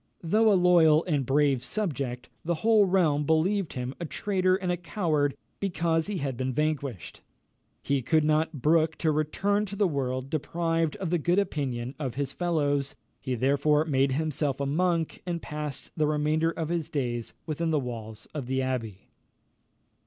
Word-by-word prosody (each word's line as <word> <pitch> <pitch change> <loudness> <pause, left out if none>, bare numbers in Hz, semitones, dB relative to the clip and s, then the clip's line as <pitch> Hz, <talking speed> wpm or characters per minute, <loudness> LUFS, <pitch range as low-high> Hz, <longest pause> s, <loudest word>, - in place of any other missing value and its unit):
Though 215 +6 +4
a - - +5
loyal 170 -3 +5
and 145 -7 0
brave 140 -2 +2
subject, 135 - -2 0.2
the 170 +3 -2
whole 220 -3 +6
realm 165 -6 +2
believed 165 +4 +1
him 125 0 -4
a 170 - -3
traitor 185 +1 +1
and 185 -2 -2
a - - +1
coward 160 -6 0 0.2
because 170 -4 0
he 205 -2 -2
had 140 -5 -2
been 130 +2 -2
vanquished. 140 - -2 0.6
He 140 -1 +1
could 155 +5 +2
not 155 -2 0
brook 160 0 +3
to 160 - +1
return 195 +8 0
to 200 - -5
the 200 -1 +2
world 130 -3 -2
deprived 165 +1 0
of 185 -4 -4
the 175 - +2
good 175 +4 +1
opinion 135 -10 -1
of 130 -5 -3
his 140 -1 -3
fellows; 145 -5 0 0.2
he 130 -2 -3
therefore 145 +5 +2
made 135 -3 +2
himself 150 -2 -1
a 140 - -1
monk, 165 +2 0
and 170 -1 -1
passed 150 -3 -5
the 155 -2 +1
remainder 155 +2 +1
of 160 -1 -3
his 170 -3 -2
days 120 -5 -3
within 165 +1 -2
the 155 - +2
walls 110 -4 -7
of 145 -5 -5
the 130 +1 0
abbey. 120 -7 -4
155 Hz, 170 wpm, -27 LUFS, 135-170 Hz, 0.6 s, whole